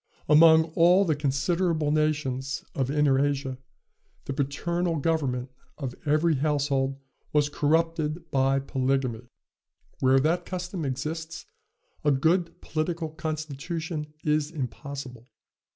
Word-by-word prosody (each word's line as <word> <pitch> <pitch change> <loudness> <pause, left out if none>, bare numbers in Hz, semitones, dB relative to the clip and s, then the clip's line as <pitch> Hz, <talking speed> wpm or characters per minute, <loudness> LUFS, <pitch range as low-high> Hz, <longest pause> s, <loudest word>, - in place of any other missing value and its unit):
"Among 160 +1 +7
all 180 +4 +5
the 160 -4 +1
considerable 150 +3 0
nations 145 -4 -1
of 135 -2 -1
Inner 140 -2 +3
Asia, 135 -2 -2 0.7
the 140 - -3
paternal 165 +5 -1
government 135 -5 -1 0.3
of 135 -5 -4
every 155 +1 +3
household 140 -2 0 0.4
was 150 -1 +3
corrupted 160 +2 0
by 135 0 +2
polygamy: 130 -3 -1 0.7
where 130 0 +4
that 165 +6 +1
custom 180 -2 -4
exists, 160 +5 -4 0.6
a 150 - +3
good 165 +5 +1
political 160 +1 -2
constitution 155 0 -4
is 150 -1 +1
impossible. 135 -4 -6
150 Hz, 105 wpm, -27 LUFS, 135-165 Hz, 0.7 s, Among